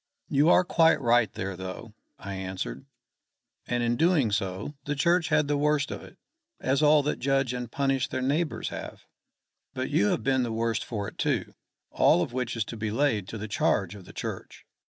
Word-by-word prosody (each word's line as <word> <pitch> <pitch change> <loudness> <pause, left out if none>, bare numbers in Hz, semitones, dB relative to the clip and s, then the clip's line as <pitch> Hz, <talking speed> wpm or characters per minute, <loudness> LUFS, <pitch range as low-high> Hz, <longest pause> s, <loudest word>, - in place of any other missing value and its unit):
"You 145 +4 +4
are 180 - +6
quite 165 -2 +4
right 120 -4 +3
there 95 0 -4
though," 95 +4 -7 0.2
I 100 +1 -7
answered. 95 +7 -5 0.8
"And 120 -1 0
in 120 0 +1
doing 160 - +3
so, 100 +5 -2
the 145 - -1
Church 170 +3 +2
had 150 - +2
the 145 0 0
worst 150 -1 +1
of - - -5
it - - -14 0.4
as 135 +2 +1
all 150 -1 +5
that 150 - -1
judge 135 -2 +1
and 125 -2 -5
punish 135 -2 0
their 130 - -3
neighbours 150 +5 -1
have. - - -8 0.7
But - - -3
you 100 - +3
have 110 - 0
been 130 +2 +2
the 120 -2 -1
worse 115 0 0
for 105 -4 -4
it, - - -11
too: - - 0 0.4
all 90 - +4
of 120 - -6
which 125 -2 -2
is 115 -2 -1
to 115 - -7
be 110 0 -2
laid 110 -4 +1
to 115 - -6
the 105 +1 -5
charge 100 -2 +1
of 100 -3 -11
the - - -12
Church. - - -7
120 Hz, 200 wpm, -27 LUFS, 105-145 Hz, 0.8 s, are